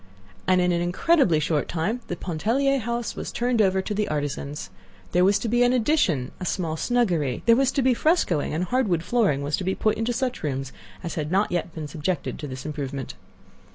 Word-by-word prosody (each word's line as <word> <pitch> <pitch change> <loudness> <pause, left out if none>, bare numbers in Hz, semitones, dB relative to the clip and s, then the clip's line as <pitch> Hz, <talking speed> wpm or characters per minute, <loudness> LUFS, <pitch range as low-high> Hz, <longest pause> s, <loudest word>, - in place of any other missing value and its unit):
And 185 0 +4
in 180 0 +2
an 170 0 +1
incredibly 180 - +3
short 155 -1 0
time 200 +9 -1
the 175 - -3
Pontellier 230 - 0
house 235 -1 -3
was - - -5
turned 240 -1 +1
over 190 -1 +2
to 210 - -3
the 210 0 0
artisans. 145 -3 -4 0.4
There 180 - +3
was 195 +2 +4
to 215 - -3
be 240 +2 +2
an 245 0 +4
addition—a 215 - +1
small 170 -3 -1
snuggery; 175 - 0
there 230 - +6
was 265 +1 +2
to 275 - +1
be 255 0 +4
frescoing, 240 - +1
and 160 +4 -1
hardwood 185 -6 +1
flooring 195 - +1
was 145 +1 0
to - - -4
be 190 +1 0
put 215 - +1
into 225 +2 0
such 250 +1 -2
rooms 135 -3 -3 0.3
as 170 - -4
had 150 -1 -3
not 195 +3 +2
yet 175 -1 -2
been 155 -2 -5
subjected 160 +4 -3
to 150 - -5
this 130 -1 -7
improvement. 140 -3 -4
185 Hz, 205 wpm, -25 LUFS, 155-240 Hz, 0.4 s, there